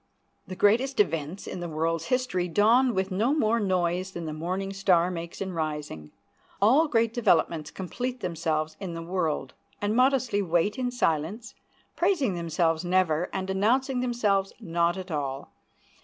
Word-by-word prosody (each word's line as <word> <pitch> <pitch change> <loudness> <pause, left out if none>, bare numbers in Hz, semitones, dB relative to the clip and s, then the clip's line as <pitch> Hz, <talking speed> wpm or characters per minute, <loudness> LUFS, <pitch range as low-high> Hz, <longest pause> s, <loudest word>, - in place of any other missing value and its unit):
The 185 - -6
greatest 235 +8 +2
events 165 -1 0
in - - -6
the 175 -1 -5
world's 165 +1 -1
history 250 -8 0
dawned 230 +8 +3
with 190 +1 -1
no 225 +10 +1
more 230 -5 +2
noise 185 -2 0
than 170 -1 -5
the 155 - -4
morning 185 +5 -3
star 185 -2 +3
makes 170 0 -6
in 190 -1 -3
rising. 150 - -4 0.5
All 260 +11 +5
great 230 -4 +1
developments 170 -9 +2
complete 245 +7 -5
themselves 160 -4 -2
in 180 -4 -5
the 165 - -5
world, 165 -6 -2 0.3
and 205 +1 -1
modestly 255 -4 +2
wait 180 +4 0
in 250 -1 0
silence, 210 0 -1 0.4
praising 340 - +1
themselves 165 -1 0
never, 175 -2 +1
and 190 0 -3
announcing 250 +7 +1
themselves 210 -6 0
not 170 -3 0
at 185 -1 -7
all. 140 -2 -4
185 Hz, 155 wpm, -27 LUFS, 165-225 Hz, 0.5 s, All